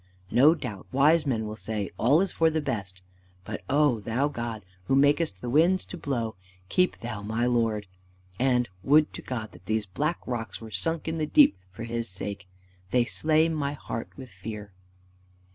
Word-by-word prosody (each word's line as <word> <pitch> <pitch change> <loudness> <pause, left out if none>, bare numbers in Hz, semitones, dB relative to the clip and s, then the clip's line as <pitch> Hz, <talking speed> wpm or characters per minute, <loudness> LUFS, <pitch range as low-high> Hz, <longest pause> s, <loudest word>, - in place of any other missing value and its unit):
No 150 +6 +6
doubt 120 - -7
wise 150 +4 +4
men 115 -5 0
will 105 0 -5
say, 110 -2 -4
'All 140 +9 +4
is 195 - 0
for 165 0 +3
the 160 0 0
best.' 100 -10 -4 0.4
But, 105 -1 -5
oh 145 -5 +3
Thou 115 +7 0
God, 115 -7 -5 0.2
who 135 - +2
makest 145 - +3
the - - -5
winds 170 +7 +4
to - - -8
blow, 125 -9 -2 0.4
keep 180 0 +2
Thou 115 -3 -5
my 110 +3 -1
lord! 115 -4 +1 0.5
And 125 -1 +2
would 150 +7 +4
to - - -7
God 110 -4 -5
that 90 - -17
these 110 -1 0
black 150 - -1
rocks 120 -2 -4
were 110 -1 -10
sunk 165 - -2
in 160 0 -2
the 155 - 0
deep 295 - +6 0.2
for 105 +5 -8
his 115 0 -3
sake! 95 +1 -5 0.4
They 125 +2 +3
slay 155 +5 +2
my 150 -3 -1
heart 115 -5 -5
with 130 -4 -9
fear." 100 +1 -8
120 Hz, 180 wpm, -27 LUFS, 110-150 Hz, 0.5 s, No